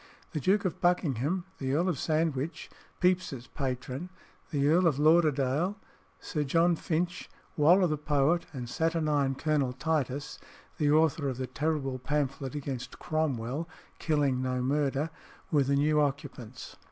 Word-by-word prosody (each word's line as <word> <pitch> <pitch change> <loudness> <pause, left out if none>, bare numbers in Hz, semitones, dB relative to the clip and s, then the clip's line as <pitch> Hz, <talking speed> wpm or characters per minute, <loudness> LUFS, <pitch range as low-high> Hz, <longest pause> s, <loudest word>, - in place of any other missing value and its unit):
The 155 - -2
Duke 195 +7 +2
of 185 - -2
Buckingham, 175 -1 +1
the 130 -1 -1
earl 170 +4 +2
of 175 -7 -1
Sandwich 155 -1 -1 0.3
(Pepys's 180 -9 +1
patron), 130 +4 -4 0.4
the 145 -3 +1
Earl 170 +4 +4
of 150 -5 +2
Lauderdale, 155 +3 +3 0.4
Sir 150 -3 -2
John 165 +5 +3
Finch, 175 +3 -2 0.3
Waller 175 +5 +5
the 155 -3 -1
poet, 150 +3 +1
and 125 -4 -6
saturnine 150 -2 +1
Colonel 145 -3 0
Titus 145 -1 -2 0.4
(the 150 -2 +3
author 155 -2 +3
of 130 - -4
the 130 - -2
terrible 135 0 -2
pamphlet 140 0 -2
against 135 -3 -5
Cromwell, 150 0 -2 0.3
Killing 145 -5 +1
no 130 -1 -1
Murder) 145 +3 0 0.4
were 150 -3 +4
the 140 +1 +2
new 150 +2 +3
occupants. 135 -4 -4
150 Hz, 140 wpm, -29 LUFS, 135-160 Hz, 0.4 s, Waller